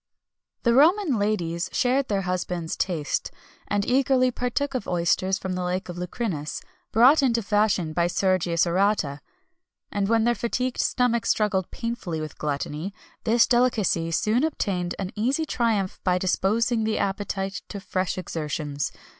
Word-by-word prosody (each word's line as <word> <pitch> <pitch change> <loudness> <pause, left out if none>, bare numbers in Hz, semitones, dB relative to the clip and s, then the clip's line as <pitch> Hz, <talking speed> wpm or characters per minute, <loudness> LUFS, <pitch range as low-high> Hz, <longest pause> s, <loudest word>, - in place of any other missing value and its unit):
The 235 - +4
Roman 310 - +4
ladies 185 -4 -1
shared 260 +1 +1
their 200 -2 0
husbands' 180 -2 -2
taste, 160 -6 -1 0.4
and 205 0 0
eagerly 255 0 +3
partook 250 +4 -2
of 255 -6 -3
oysters 180 +2 +1
from 190 -2 -4
the 180 - -2
lake 180 +1 -2
of 175 - -5
Lucrinus, 180 -4 -3 0.3
brought 260 +7 +6
into 235 -4 +2
fashion 200 -6 +1
by 170 +1 +2
Sergius 180 -2 +1
Orata, 175 -5 +1 0.7
and 200 0 -1
when 225 -1 +3
their 240 +1 +3
fatigued 245 +2 -2
stomachs 245 -2 +1
struggled 195 -4 +1
painfully 230 -9 -4
with 155 -1 -7
gluttony, 150 +6 -3 0.3
this 230 +1 +5
delicacy 230 -9 +2
soon 215 - +1
obtained 185 - -1
an 190 -1 -4
easy 265 +9 0
triumph 220 -8 0
by 180 -1 +2
disposing 220 +5 +1
the 215 0 0
appetite 195 0 -2
to 200 - -5
fresh 185 -1 -2
exertions. 150 -4 -3
200 Hz, 145 wpm, -25 LUFS, 180-235 Hz, 0.7 s, brought